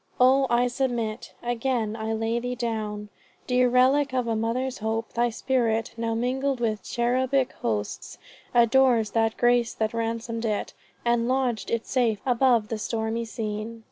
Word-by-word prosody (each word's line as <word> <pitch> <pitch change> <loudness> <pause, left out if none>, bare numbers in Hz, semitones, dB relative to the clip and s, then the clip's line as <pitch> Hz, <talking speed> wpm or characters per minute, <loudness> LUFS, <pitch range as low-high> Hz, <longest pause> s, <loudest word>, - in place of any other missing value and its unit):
O 265 +2 +5
I 240 +1 +3
submit. 240 -3 -2
Again 240 -2 -1
I 220 0 -3
lay 225 +1 0
thee 245 +1 -3
down, 215 -3 -3 0.4
Dear 250 0 +3
relic 260 +3 +3
of 250 -2 +1
a 230 -1 0
mother's 245 +4 -2
hope. 225 +1 -2
Thy 240 +1 +2
spirit, 230 -1 0
Now 230 0 -2
mingled 260 +3 -1
with 220 -3 -1
cherubic 255 +2 0
hosts, 105 -3 -3 0.3
adores 235 -2 +4
That 225 -1 +1
grace 240 -1 +2
that 220 0 -1
ransomed 230 0 -3
it, 210 -2 -2 0.3
and 235 0 +2
lodg'd 255 -5 0
it 230 -1 -1
safe 235 -5 +1
Above 245 -3 +3
the 225 - -3
stormy 225 +1 -2
scene." 220 0 -5
235 Hz, 150 wpm, -26 LUFS, 225-250 Hz, 0.4 s, O